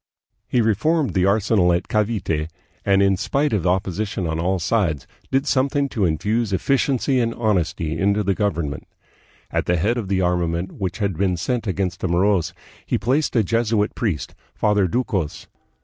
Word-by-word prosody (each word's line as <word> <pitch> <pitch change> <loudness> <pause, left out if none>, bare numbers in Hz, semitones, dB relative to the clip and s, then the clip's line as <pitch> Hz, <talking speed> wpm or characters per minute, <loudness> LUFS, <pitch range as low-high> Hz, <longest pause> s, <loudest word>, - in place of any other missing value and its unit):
He 125 - +2
reformed 140 - +1
the 95 -1 +2
arsenal 100 -3 +3
at 85 +1 0
Cavite, 100 -8 -1 0.3
and, 100 0 +3
in 95 -1 +3
spite 145 +6 0
of 95 -4 0
opposition 95 +1 -1
on 80 0 -2
all 95 +3 +1
sides, 85 - 0 0.2
did 135 +1 +1
something 140 +1 +1
to 105 -7 0
infuse 105 +7 0
efficiency 135 +5 +1
and 115 -1 0
honesty 85 -7 -1
into 100 +1 +2
the 100 0 +1
government. 85 -9 -2 0.6
At - - -1
the 90 - +2
head 110 +9 +1
of 105 - -5
the 95 -1 0
armament 90 -1 0
which 95 -3 -4
had 100 -6 -2
been 95 -2 +1
sent 120 +6 -2
against 95 -2 -2
the - - -1
Moros 90 -1 +2 0.3
he - - -1
placed 135 +8 0
a 115 - +4
Jesuit 115 0 +1
priest, 90 - -2 0.2
Father 105 -3 +2
Ducos. 95 - -2
100 Hz, 165 wpm, -22 LUFS, 90-115 Hz, 0.6 s, a